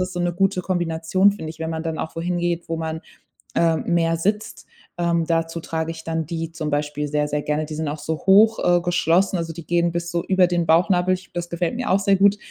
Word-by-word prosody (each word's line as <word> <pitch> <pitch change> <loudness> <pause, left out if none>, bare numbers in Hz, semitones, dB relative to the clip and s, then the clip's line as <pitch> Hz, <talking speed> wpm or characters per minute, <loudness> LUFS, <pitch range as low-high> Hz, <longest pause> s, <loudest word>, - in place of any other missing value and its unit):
ist 185 0 -2
so 175 - -5
'ne 175 0 0
gute 185 0 +1
Kombination, 175 +2 +1
finde 160 -6 -6
ich, 160 0 -12
wenn 160 0 -2
man 160 0 -4
dann 160 -1 -3
auch 160 - -6
wo - - -2
hingeht, 175 -1 -2
wo 165 - -2
man, 160 0 -4 0.6
äh, 165 -1 +3
mehr 165 -1 +1
sitzt. 210 +5 -2 0.3
Ähm, 170 -1 +1
dazu 165 0 -1
trage 160 0 -3
ich 160 0 -9
dann 160 -1 -2
die 165 -1 -4
zum 155 -2 -4
Beispiel 150 0 -2
sehr, 150 0 0
sehr 150 0 -1
gerne. 150 +1 -1
Die 155 - -8
sind 155 0 -3
auch 150 +2 -3
so 160 -1 -3
hoch, 215 +3 +6
äh, 175 0 +3
geschlossen, 175 +2 +2
also, 165 -1 -4
die 170 -2 -9
gehen 170 0 +1
bis 170 0 -3
so 170 0 -1
über 185 -1 +4
den 175 -1 0
Bauchnabel. 180 +2 +3
Ich 185 - -11
glaube, - - -41
das 175 0 -3
gefällt 170 +2 -2
mir 250 +1 -3
auch 195 - +4
sehr 195 0 +3
gut. 200 +1 +4
170 Hz, 250 wpm, -22 LUFS, 160-180 Hz, 0.6 s, hoch